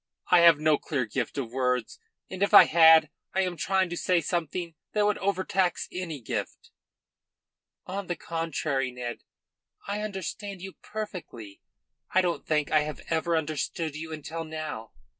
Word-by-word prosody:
I 180 - +8
have 170 -3 +7
no 155 -1 +3
clear 135 -5 -2
gift 115 +3 -3
of 125 -5 -3
words, 125 -2 -1 0.3
and 190 0 -8
if 200 +1 +4
I - - +12
had, 160 -1 +6 0.2
I 190 - +3
am 180 -2 -1
trying 190 +2 +1
to - - -2
say 180 0 +2
something 170 +1 -3 0.2
that 210 -1 +2
would 210 0 +1
overtax 190 -1 0
any 175 -5 -5
gift." 115 - -5 1.1
"On 195 0 -5
the 175 - -2
contrary, 155 -6 -2
Ned, 125 -1 -6 0.7
I 205 +1 -3
understand 200 -1 -5
you 190 +1 -8
perfectly. 175 - -7 0.5
I 185 - +4
don't 175 -2 -2
think 150 -2 +1
I 155 - +5
have 150 0 -4
ever 165 +1 +1
understood 155 0 -2
you 160 +1 -6
until 160 +2 -5
now. 155 -8 -6
165 Hz, 160 wpm, -27 LUFS, 150-185 Hz, 1.1 s, I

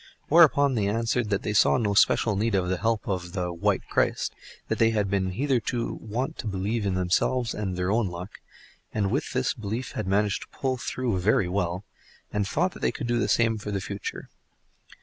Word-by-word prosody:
Whereupon 145 -4 +6
they 105 -5 +1
answered 115 +1 0
that 100 -2 0
they 105 - -1
saw 105 - +5
no 105 -4 0
special 105 +1 +4
need 110 +1 +1
of 90 -2 +1
the 95 -1 -1
help 115 -1 0
of 90 -2 -3
the 90 -3 -2
"White 85 - 0
Christ"; - - 0 0.3
that - - -2
they 115 - +5
had 105 -3 0
been 95 -2 +1
hitherto 125 0 0
wont 115 +5 -3
to - - -4
believe 100 +2 -1
in 95 - 0
themselves 100 +7 +1
and 95 -4 -3
their 90 +1 0
own 110 -1 +2
luck, 90 +3 -8 0.5
and 100 -2 0
with 140 +6 -1
this 130 0 +1
belief 110 +3 -4
had - - -4
managed 100 +1 +1
to - - -9
pull 130 -1 0
through 120 -5 -2
very 95 -1 +2
well, 90 +1 -2 0.5
and 105 -1 0
thought 175 - -1
they - - +2
could 140 - -5
do 120 0 +1
the 100 - +1
same 115 0 +2
for 105 - -6
the 100 -1 -1
future. 100 +1 -6
105 Hz, 205 wpm, -26 LUFS, 95-120 Hz, 0.5 s, Whereupon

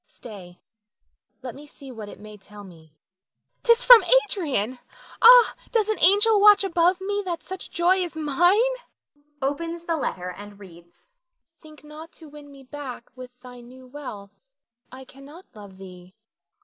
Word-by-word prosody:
Stay, 185 -6 -14 0.8
let 250 -3 -7
me 295 +2 -14
see 275 -2 -14
what 220 -4 -10
it - - -14
may 215 0 -13
tell 205 +1 -15
me. 160 -5 -18 0.7
'Tis 470 0 +2
from - - +8 0.2
Adrian. 260 - -4 0.4
Ah, 485 0 +7 0.2
does 435 -3 0
an 435 - -2
angel 410 +4 +3
watch 415 -1 +6
above 355 0 0
me 405 +2 -4
that 350 -3 -6
such 375 -1 -9
joy 350 +2 +1
is 355 -3 -5
mine? 350 - +1 0.7
[Opens 330 +5 -4
the 335 -1 -3
letter 180 -10 -5
and 205 +2 -13
reads.] 175 - -16 0.5
Think 310 -2 -17
not 305 +2 -13
to 320 - -15
win 290 -1 -15
me 275 -1 -16
back 260 -3 -10
with 250 -1 -13
thy 250 -1 -13
new 255 +2 -16
wealth; 250 -7 -11 0.6
I 260 +1 -12
cannot 280 +7 -16
love 200 -3 -14
thee. 185 -1 -15
285 Hz, 155 wpm, -23 LUFS, 215-355 Hz, 0.8 s, from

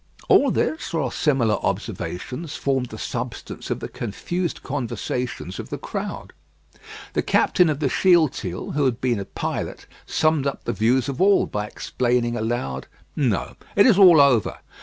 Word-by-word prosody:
All - - +6
this, 315 - -1
or 135 -7 0
similar 125 -8 +1
observations, 140 - -4
formed 135 -2 0
the 110 - -9
substance 120 +2 -5
of - - -2
the - - -4
confused 175 - -4
conversations 125 -6 -4
of - - -7
the - - -4
crowd. - - -6 0.8
The - - +1
captain 180 -3 +3
of 145 -2 -1
the 150 - +1
Shealtiel, 150 - +2
who 145 -1 +1
had 125 -2 0
been 120 -4 0
a 100 - -4
pilot, - - -4 0.2
summed 155 -3 +2
up 140 - -4
the - - -2
views 120 +5 +2
of 140 +2 -3
all 200 +1 +5
by 105 0 -3
exclaiming 120 +1 -1
aloud: 110 - -3 0.3
"No; 125 -9 0 0.2
it 200 - +6
is 215 -6 +5
all 180 -5 +8
over. 130 -8 +4
130 Hz, 160 wpm, -23 LUFS, 115-155 Hz, 0.8 s, all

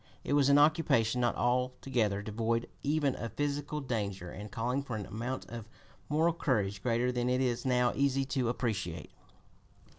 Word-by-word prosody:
It - - -1
was 140 -1 +4
an 140 - +6
occupation 145 -6 +3
not 120 -1 +2
altogether 120 -4 0
devoid 115 +2 -1
even 145 -1 +1
of 115 - -5
physical 145 +1 -2
danger, 100 -8 -3
and 105 +1 -8
calling 120 +6 -1
for 130 -5 -5
an 105 -2 -4
amount 115 +6 -4
of 115 -2 -8 0.4
moral 160 +3 +3
courage 105 -11 0
greater 120 +1 +1
than 125 0 0
it 125 0 +2
is 125 0 0
now 125 -1 +3
easy 135 -1 +1
to 130 -3 0
appreciate. 105 -9 -3
125 Hz, 160 wpm, -31 LUFS, 110-140 Hz, 0.4 s, an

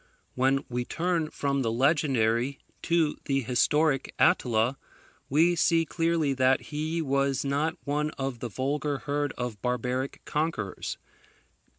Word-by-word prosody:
When 135 +2 +2
we 125 0 -2
turn 165 +2 -1
from 140 -2 -1
the 115 -3 0
legendary 130 -2 +2 0.2
to 165 -3 +1
the 135 -1 +1
historic 135 +4 +1
Attila, 120 +2 +2 0.5
we 165 +5 +4
see 165 0 +3
clearly 165 -3 +1
that 130 0 +3
he 160 +2 -1
was 140 -1 0
not 145 +4 0
one 150 +1 0
of 135 -3 -3
the 120 - -4
vulgar 140 +5 -1
herd 145 0 -2
of 120 -4 -4
barbaric 125 +2 -2
conquerors. 150 - -2
140 Hz, 125 wpm, -28 LUFS, 125-155 Hz, 0.5 s, we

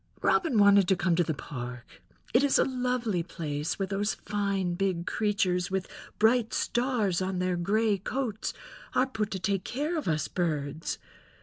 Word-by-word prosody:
Robin 330 - +3
wanted 200 -2 +6
to 190 - +4
come 175 -1 +1
to 175 - +3
the 165 - -1
park—it 125 - -4
is 285 - +4
a - - +5
lovely 250 -7 0
place—where 160 +1 -3
those 200 +2 -1
fine 195 -3 -1
big 180 -2 -1
creatures 195 -4 0
with 190 -1 -2 0.3
bright 225 +1 +3
stars 235 -8 +1
on 185 0 -1
their 180 0 0
gray 205 +4 +1
coats 225 +1 -2 0.4
are 255 - +4
put 220 -5 -2
to 195 - -3
take 190 0 0
care 295 +7 -2
of 310 - -3
us 155 -2 0
birds. 155 -3 -2
195 Hz, 160 wpm, -29 LUFS, 175-225 Hz, 0.4 s, wanted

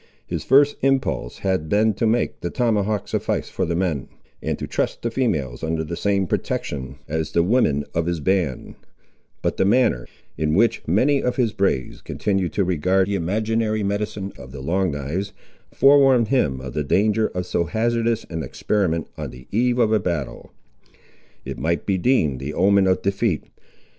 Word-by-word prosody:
His - - -4
first 140 +2 +4
impulse 135 - 0
had 95 -5 -1
been 110 +3 +3
to 110 +3 0
make 115 +2 0
the 85 - -2
tomahawk 110 -2 0
suffice - - -2
for - - -2
the 85 - -1
men, 85 -7 -1 0.3
and - - -2
to - - -4
trust - - -2
the 115 - -1
females 75 - -1
under 80 0 -1
the 80 +2 -5
same 100 +1 +1
protection 65 -5 -3
as 80 0 -3
the 85 - +3
women 85 - +2
of 85 0 0
his 85 -2 -1
band; 85 -6 -1 0.7
but - - 0
the - - +3
manner, 100 - +2 0.3
in 75 0 +1
which 115 +4 +3
many 130 - +3
of 125 - -1
his 120 -5 +1
braves 95 -10 -1
continued 95 -4 -1
to 100 - +1
regard 90 +2 +1
the - - -1
imaginary 110 +4 0
medicine 100 0 -3
of 65 - -10
the 70 0 -8
Long 95 +6 0
knives, 80 +8 -3 0.4
forewarned 135 -4 +5
him 75 - +1
of 65 -2 -7
the 75 - -1
danger 105 +8 +2
of 90 -1 -2
so 85 - 0
hazardous 115 +3 0
an 80 -1 -3
experiment 85 +3 -1
on - - -4
the 65 0 -13
eve 120 +3 +2
of 115 -3 +3
a 110 - +4
battle. 85 -8 -4 0.9
It - - -6
might 85 +1 -1
be 95 -2 0
deemed 80 - +2
the 70 +3 -5
omen 100 +1 +4
of 95 0 +1
defeat. 100 -2 0
95 Hz, 180 wpm, -22 LUFS, 80-110 Hz, 0.9 s, forewarned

